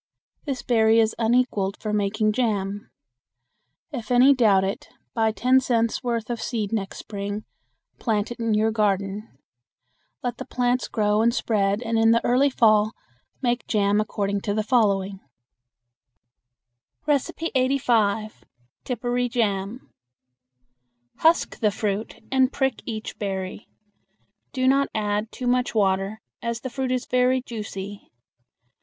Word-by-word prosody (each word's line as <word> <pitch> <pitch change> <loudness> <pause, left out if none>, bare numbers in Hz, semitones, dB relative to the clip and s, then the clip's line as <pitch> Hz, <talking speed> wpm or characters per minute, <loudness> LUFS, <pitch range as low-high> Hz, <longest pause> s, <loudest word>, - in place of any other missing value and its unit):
This 270 -4 -3
berry 225 -2 +4
is 220 0 +3
unequaled 225 -4 +1
for 215 -1 -4
making 210 +1 +1
jam. 205 -4 -1 1.0
If 235 -7 -6
any 250 +3 +6
doubt 210 -7 +4
it, 195 +1 -4 0.2
buy 220 -1 +2
ten 255 +4 +3
cents' 230 -2 0
worth 235 -1 -2
of 235 -1 -3
seed 220 -4 -3
next 195 -3 -3
spring, 205 0 -5 0.5
plant 220 -1 -1
it 240 - -7
in 230 -2 +1
your 220 +1 +2
garden. 205 -1 -1 0.9
Let 245 -1 -3
the 265 - -5
plants 245 0 0
grow 210 -1 +1
and 235 +1 +4
spread 210 -3 0
and 225 -1 0
in 225 0 +5
the 230 +1 +3
early 260 +4 +4
fall 215 -3 +3 0.5
make 240 0 0
jam 205 -1 +2
according 200 -1 -2
to 205 0 -2
the 215 - 0
following: 200 -5 +1 1.9
85. 255 - 0 0.4
Tipparee 245 0 -1
Jam. 215 0 -2 1.2
Husk 325 +1 +2
the 215 - +3
fruit 205 +1 -3
and 260 0 +3
prick 265 -4 -1
each 220 -2 -5
berry. 190 -1 -4 0.8
Do 255 -1 0
not 275 +1 +3
add 210 0 -1
too 255 - -6
much 250 -1 +1
water, 195 +1 +1 0.2
as 235 0 -3
the 260 - -5
fruit 260 0 -2
is 255 -1 -1
very 250 0 +2
juicy. 205 -4 -7
225 Hz, 130 wpm, -24 LUFS, 205-245 Hz, 1.9 s, any